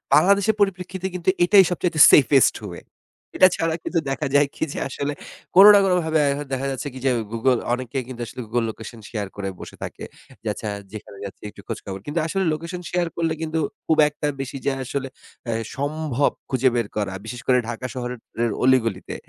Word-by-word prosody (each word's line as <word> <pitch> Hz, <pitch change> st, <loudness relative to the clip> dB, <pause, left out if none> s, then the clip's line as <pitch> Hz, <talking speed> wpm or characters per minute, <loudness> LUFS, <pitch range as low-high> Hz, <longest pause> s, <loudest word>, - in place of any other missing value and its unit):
বাংলাদেশের 200 Hz, +6 st, +4 dB
পরিপ্রেক্ষিতে 190 Hz, -1 st, -1 dB
কিন্তু 180 Hz, 0 st, 0 dB
এটাই 195 Hz, +2 st, +7 dB
সবচাইতে 170 Hz, -2 st, -1 dB
সেফেস্ট 135 Hz, -1 st, +5 dB
ওয়ে। 85 Hz, -, -8 dB, 0.5 s
এটা 185 Hz, -, +8 dB
ছাড়া 165 Hz, -1 st, 0 dB
কিন্তু 170 Hz, -, 0 dB
দেখা 135 Hz, +1 st, -2 dB
যায় 145 Hz, 0 st, +5 dB
কি -, -, -3 dB
যে -, -, -4 dB
আসলে 140 Hz, +2 st, -3 dB, 0.4 s
কোন 195 Hz, -, +10 dB
না 205 Hz, -, +7 dB
কোন 185 Hz, -, +2 dB
ভাবে 160 Hz, -1 st, +1 dB
এখন 145 Hz, +1 st, -3 dB
দেখা 135 Hz, +1 st, -1 dB
যাচ্ছে 135 Hz, +2 st, -4 dB
কি 130 Hz, -, -8 dB
যে 130 Hz, -, +4 dB, 0.2 s
Google 120 Hz, +1 st, +2 dB
অনেকেই 130 Hz, +1 st, -3 dB
কিন্তু 125 Hz, -2 st, -8 dB
আসলে 125 Hz, -, -8 dB
Google 115 Hz, +1 st, 0 dB
Location 110 Hz, +1 st, -10 dB
শেয়ার 105 Hz, -4 st, -3 dB
করে 100 Hz, -1 st, -4 dB
বসে -, -, -10 dB
থাকে। -, -, -7 dB, 0.4 s
যে -, -, -6 dB
আচ্ছা 110 Hz, -, -7 dB, 0.2 s
যেখানে 105 Hz, -2 st, -10 dB
যাচ্ছি 100 Hz, -, -10 dB
একটু 100 Hz, -, -14 dB
খোঁজখবর। 95 Hz, -1 st, -6 dB
কিন্তু 150 Hz, +3 st, -2 dB
আসলে 195 Hz, +3 st, -1 dB
লোকেশন 170 Hz, +3 st, -5 dB
শেয়ার 175 Hz, -1 st, +1 dB
করলে 165 Hz, -1 st, 0 dB
কিন্তু 160 Hz, 0 st, -2 dB, 0.3 s
খুব 160 Hz, -, +3 dB
একটা 150 Hz, 0 st, -4 dB
বেশি 135 Hz, 0 st, -5 dB
যে 140 Hz, -, +2 dB
আসলে 135 Hz, +1 st, -3 dB, 0.4 s
এ্যা 115 Hz, -1 st, -2 dB, 0.2 s
সম্ভব 145 Hz, -1 st, 0 dB, 0.2 s
খুঁজে 130 Hz, 0 st, +3 dB
বের 115 Hz, -3 st, 0 dB
করা, 100 Hz, -3 st, -1 dB
বিশেষ 120 Hz, +2 st, -6 dB
করে 125 Hz, -, +5 dB
ঢাকা 120 Hz, +2 st, -5 dB
শহরের 125 Hz, -1 st, -5 dB, 0.2 s
এ -, -, +3 dB, 0.2 s
অলিগলিতে। 115 Hz, -7 st, +1 dB
135 Hz, 195 wpm, -23 LUFS, 120-165 Hz, 0.5 s, কোন